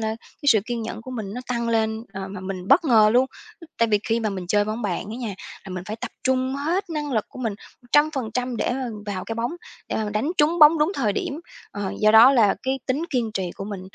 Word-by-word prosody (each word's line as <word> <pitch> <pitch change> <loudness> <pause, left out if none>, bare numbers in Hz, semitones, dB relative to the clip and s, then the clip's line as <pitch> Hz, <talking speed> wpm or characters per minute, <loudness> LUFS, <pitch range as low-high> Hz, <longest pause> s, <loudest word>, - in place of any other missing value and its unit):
là 220 - -1 0.3
cái 285 - +2
sự 215 -5 +6
kiên 240 -2 -3
nhẫn 220 0 -6
của 255 - -9
mình 215 -4 -5
nó 250 - -4
tăng 235 -1 -1
lên, 220 0 0
ờ, 195 0 -5
mà 190 -1 -7
mình 190 -1 -6
bất - - +5
ngờ 220 -5 +5
luôn. 255 +2 +4 0.5
Tại 230 -1 +3
vì 210 -1 +3
khi 230 +1 +1
mà 215 -2 -1
mình 185 -2 -5
chơi 205 +2 +2
bóng 215 +2 -4
bàn 190 -1 -2
á 225 - -5
nha, 225 -6 -4 0.3
là 190 - -9
mình 185 0 -5
phải 215 +1 -4
tập - - -6
trung 260 0 +1
hết 340 +6 -1
năng 295 -3 -3
lực 215 -3 +1
của - - -12
mình 225 -5 -2 0.3
100% 250 -3 +1
để - - 0
mà 260 0 -3 0.2
vào 190 -3 -4
cái 225 - -4
bóng, 235 +6 -2 0.4
để - - -2
mà 220 - -1
mình 210 - -4
đánh 225 +10 0
trúng 320 +4 +3
bóng 305 +1 +8
đúng 305 +6 +2
thời 215 - +1
điểm. 285 +8 -3 0.3
Ờ, 200 -2 -4
do 215 0 +5
đó 225 +5 +8
là 225 -7 +4
cái 265 +1 -1
tính 275 +5 0
kiên 240 -5 0
trì 185 -2 -2
của 195 - -5
mình, 200 -2 -6
230 Hz, 260 wpm, -23 LUFS, 210-260 Hz, 0.5 s, bóng